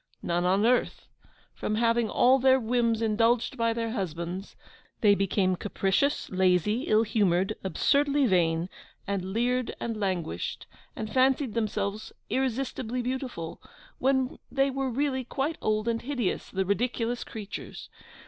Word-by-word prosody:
None 175 +1 0
on 195 +4 +3
earth. 245 +1 +1 0.5
From 215 - -2
having 230 0 +2
all 255 +5 +4
their 260 0 +5
whims 230 -1 +1
indulged 225 +3 +2
by 230 -2 +1
their 230 0 -2
husbands, 180 -2 -4 0.5
they 205 -2 +6
became 195 -1 +1
capricious, 205 +9 0
lazy, 185 - +2
ill 215 +1 +4
humoured, 200 -3 +1
absurdly 280 - +2
vain, 170 -5 +2 0.4
and 200 -2 -2
leered 240 +6 -1
and 230 -1 -3
languished, 175 - -3 0.3
and 215 -1 -5
fancied 260 -2 +2
themselves 210 -2 -2 0.2
irresistibly 255 -2 -1
beautiful, 250 -10 -4 0.4
when 265 -1 +1
they 275 0 +2
were 270 0 -1
really 265 +1 -1
quite 275 +6 -3
old 215 +1 0
and 230 -1 0
hideous, 245 -6 -2
the 190 0 -1
ridiculous 235 +3 -1
creatures! 210 -3 -8
225 Hz, 130 wpm, -28 LUFS, 195-255 Hz, 0.5 s, they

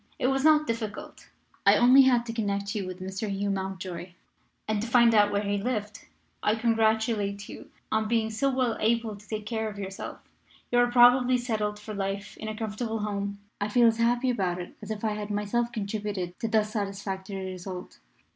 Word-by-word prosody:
It 255 - +1
was 270 0 0
not 305 -1 +5
difficult; 225 -4 -5 0.3
I - - +6
only 255 +3 +7
had 245 -3 +4
to 230 - -5
connect 200 -3 -2
you 200 -3 -3
with 185 0 -7
Mr. 190 +3 -4
Hugh 200 +1 -1
Mountjoy 190 -2 -5 0.5
and 215 -1 0
to 230 - -3
find 235 -1 +5
out 205 -1 +5
where 205 0 0
he 205 0 0
lived. 210 -2 -3 0.3
I 210 - +2
congratulate 220 -3 +1
you - - -10 0.2
on 220 0 +1
being 225 -1 +1
so 275 +6 +1
well 255 -4 +1
able 225 -1 +1
to 205 +1 -16
take 215 -1 -4
care 220 0 -2
of 205 - -10
yourself. 195 -1 -6 0.5
You 245 - +4
are 245 0 +4
probably 250 +1 +6
settled 215 -4 -2
for 210 +1 -8
life 195 0 -4
in 220 - -6
a 215 0 -4
comfortable 225 +1 -3
home. 200 -1 -3 0.2
I 205 - +1
feel 240 +3 +4
as 225 -1 +4
happy 240 +2 +2
about 185 -6 -1
it 175 - -7
as 210 - -9
if 215 0 -4
I 215 - +1
had 210 0 -5
myself 210 +4 -1
contributed 205 -4 -3
to 225 - -1
thus 215 -1 +1
satisfactory 195 -2 -4
result. 185 0 -8
215 Hz, 195 wpm, -27 LUFS, 200-230 Hz, 0.5 s, only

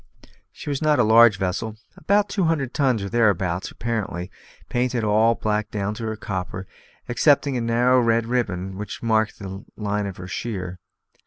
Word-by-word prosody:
She 145 - -6
was 140 - -2
not 155 -1 +3
a - - +4
large 110 -1 +6
vessel; 95 +4 -2 0.2
about 205 +1 +2
two 195 -2 0
hundred 150 -6 0
tons 130 -7 +1
or 100 - -4
thereabouts, 95 -6 +1
apparently; 105 -6 -4 0.4
painted 125 -1 0
all 110 +2 +3
black 105 -1 -1
down 105 0 -2
to 110 +1 -6
her 110 - -3
copper, 95 -3 -5 0.4
excepting 140 +2 +3
a 120 - -1
narrow 120 +2 +3
red 115 -1 +2
ribbon 95 -6 -2
which 105 +2 -6
marked 110 -1 +1
the 95 0 -7
line 105 -1 -1
of 95 - -7
her 90 - -8
sheer. 95 -4 -5
110 Hz, 170 wpm, -23 LUFS, 100-120 Hz, 0.4 s, large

